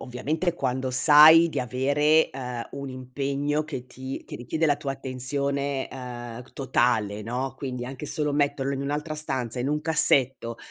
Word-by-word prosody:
ovviamente 155 +8 -2
quando 130 -4 -2
sai 155 +5 +8
di - - -4
avere, 145 +5 +2
uhm, 125 -3 -6
un 140 -1 -6
impegno 140 +3 -2
che 125 -4 -7
ti 130 +1 -7
che - - -7
richiede 160 +7 -1
la 145 -2 +2
tua 140 -2 -4
attenzione, 140 +1 -2
uhm, 120 -2 -7
totale, 110 -6 0
no, 125 +4 -3
quindi 125 -3 -5
anche 135 +3 -7
solo 150 0 -1
metterlo 145 -1 0
in 135 - -4
un'altra 150 +2 -3
stanza, 130 -6 -3
in 130 - -1
un 150 - 0
cassetto, 135 -6 +2
135 Hz, 155 wpm, -25 LUFS, 125-145 Hz, -, sai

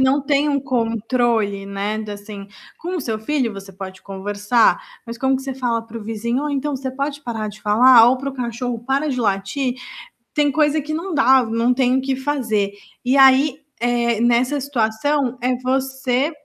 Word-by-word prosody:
não 265 +2 +3
têm 285 +1 +1
um 280 -1 +1
controle, 230 -4 0
né, 200 +2 -3
de, 215 -1 -6
assim, 205 -1 -9 0.3
com 360 +3 -4
o - - -2
seu 225 -5 -3
filho 245 0 -1
você 195 -1 -10
pode 190 0 -9
conversar, 205 - +1 0.2
mas 230 -1 -8
como 265 +1 +2
que 265 - -7
você 270 0 -4
fala 240 -3 -1
para 230 0 -9
o - - -9
vizinho: 235 +4 -2
"Ou, 300 - -2
então, 285 0 -2
você 260 0 -4
pode 280 +2 -4
parar 225 -4 -4
de 210 0 -11
falar?", 230 +3 +6
ou 255 - +3
para 275 +2 -4
o - - -10
cachorro: 240 -1 -3
"Para 275 +3 0
de 255 -3 -2
latir?". 210 +5 -1 0.6
Tem 295 -2 +2
coisa 300 +1 +2
que 305 +2 -5
não 340 +4 -3
dá, 265 -2 +5
não 230 +2 +1
tem 255 0 +2
o - - 0
que 265 0 -1
fazer. 245 -7 -1 0.3
E 260 +2 +2
aí, 270 +1 +5 0.2
eh, 235 -2 +1
nessa 245 +4 +2
situação, 255 +1 0
é 250 0 0
você 265 +2 -1
250 Hz, 195 wpm, -20 LUFS, 220-270 Hz, 0.6 s, falar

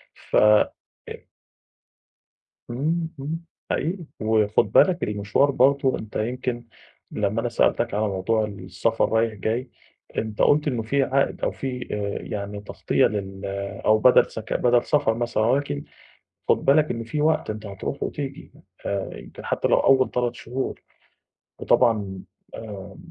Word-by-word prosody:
ف - - -6 0.7
إ - - -9 1.5
إمم، 160 +7 -1
إمم، 155 +4 -3 0.3
حقيقي. 170 +3 -1 0.2
وخُد 110 -2 +2
بالك 180 -2 +5
المشوار 105 +7 +1
برضه، 135 0 +3
أنت 110 - -9
يمكن 120 +1 -2 0.5
لمّا 105 +2 -1
أنا 120 - -1
سألتك 115 0 +1
على 105 0 +1
موضوع 105 +3 0
السفر 100 +2 -1
رايح 115 -1 +2
جاي، 115 +5 -2 0.5
أنت 110 -1 -1
قُلت 150 +1 +4
إنه 120 -5 -1
في 135 +5 +1
عائد 135 +1 +1
أو - - 0
في 125 -2 -5
آآ، 100 -1 -3
يعني 100 0 -5
تغطية 105 - +1
لل 95 -1 -4 0.4
أو 110 0 +5
بَدَل 125 +3 +5
سك 110 -1 -7
بَدَل 120 -1 +3
سفر 130 -6 +2
مثلًا، 115 -2 -1
ولكن 125 - 0 0.7
خُد - - +2
بالك 150 +2 +4
إن 115 -1 -3
في 150 +6 -3
وقت 155 -4 +2
أنت 110 0 -5
هترُوح 100 +7 -5
وتيجي 140 -2 -5 0.3
آآ 100 -1 -3
يمكن - - -11
حتى - - 0
لو - - +4
أول 130 -1 +4
3 120 -1 -1
شهور 130 +3 -4 0.8
وطبعًا 105 -6 +2 0.3
آمم 105 -4 -8
115 Hz, 140 wpm, -24 LUFS, 105-135 Hz, 1.5 s, بالك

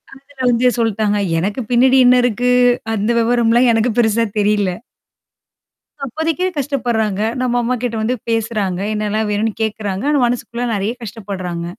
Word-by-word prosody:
அதுல 275 +1 -19
வந்து 245 +1 +3
சொல்ட்டாங்க. 215 -2 0 0.2
எனக்கு 200 +7 -2
பின்னாடி 255 +2 +4
என்ன 250 0 +6
இருக்கு? 245 +1 +1 0.4
அந்த 210 0 -1
விவரம்லாம் 235 +1 +3
எனக்கு 225 +2 +1
பெருசா 230 0 +2
தெரியல. 205 -1 +1 1.4
அப்போதைக்கு 320 +7 -2
கஷ்டப்படுறாங்க. 240 -7 -1 0.2
நம்ம 245 -1 0
அம்மாக்கிட்ட 245 -1 -2
வந்து 235 +4 0
பேசுறாங்க, 215 -5 -1
என்னலாம் 215 +1 -1
வேணும்ன்னு 215 +1 0
கேட்குறாங்க. 210 -3 -3
ஆனா 295 -1 +2
மனசுக்குள்ள 240 0 -3
நெறைய 205 +3 -2
கஷ்டப்படுறாங்க. 190 -6 -6
225 Hz, 125 wpm, -17 LUFS, 210-245 Hz, 1.4 s, என்ன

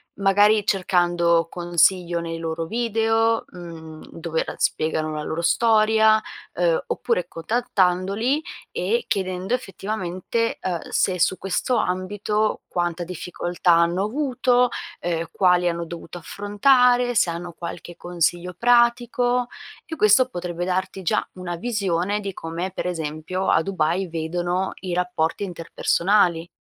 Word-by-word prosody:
magari 205 +2 +4
cercando 175 -3 +2
consiglio 175 0 +2
nei 165 0 -4
loro 165 0 -3
video, 225 +2 +1
mhmm, 165 -3 -10
dove 165 -1 -2
l - - -5
spiegano 155 0 0
la 150 - -3
loro 160 +2 -3
storia, 220 +3 +4 0.3
uhm, 170 -2 +1
oppure 230 -8 -1
contattandoli 200 - 0 0.3
e 470 +1 -1
chiedendo 185 +2 -2
effettivamente, 210 0 -3
uhm, 175 -3 -2
se 185 -1 +1
su 185 +2 +2
questo 195 +6 -1
ambito 205 +4 -1
quanta 175 0 -2
difficoltà 175 0 -1
hanno 170 +2 +3
avuto, 250 0 +1 0.3
ehm, 170 -1 -2
quali 180 -1 +3
hanno 170 0 -3
dovuto 170 +1 -8
affrontare, 245 - +3
se 185 - +3
hanno 170 +1 -5
qualche 175 +1 -8
consiglio 175 +1 -1
pratico, 245 +3 +2 0.4
e 320 - -6
questo 255 +1 +4
potrebbe 175 -3 -4
darti 185 +1 -2
già 170 - +1
una 180 -1 -5
visione 200 -2 -1
di 200 -2 -5
come, 170 +3 -5
per 185 - -5
esempio, 165 +2 -3
a 160 - +4
Dubai 185 0 0
vedono 175 +3 -2
i 185 -2 -4
rapporti 180 0 -1
interpersonali. 175 0 +1
180 Hz, 125 wpm, -23 LUFS, 170-215 Hz, 0.4 s, magari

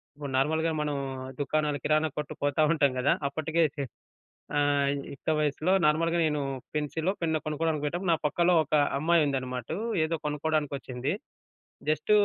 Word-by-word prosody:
ఇప్పుడు 145 -1 -6
నార్మల్‌గా 160 +4 +2
మనం 150 -1 -1 0.4
దుకాణాలు 150 0 0
కిరాణా 155 +1 +3
కొట్టు 150 - -4
పోతాఉంటాం 145 -1 +3
గదా! 140 - +4 0.2
అప్పటికే 160 +3 0
చే 140 - -1 0.7
ఆహ్, 145 -1 +3 0.2
యుక్త 140 - -4
వయస్సులో 150 +4 +1
నార్మల్‌గా 165 +3 +2
నేను 150 -1 0 0.3
పెన్సిలో 155 +4 -1
పెన్నో 160 -2 +1
కొనుక్కోవడానికి 155 0 -1
పోయేటప్పుడు. 175 +4 -1
నా - - -2
పక్కలో 170 +4 +3
ఒక 155 - -3 0.2
అమ్మాయి 160 +1 +4
ఉందన్నమాటూ. 130 +1 -3 0.3
ఏదో 160 +1 -1
కొనుక్కోవడానికి 150 0 0
ఒచ్చింది. 130 +2 -3 0.8
జస్ట్ 155 +7 0
150 Hz, 135 wpm, -28 LUFS, 145-160 Hz, 0.8 s, గదా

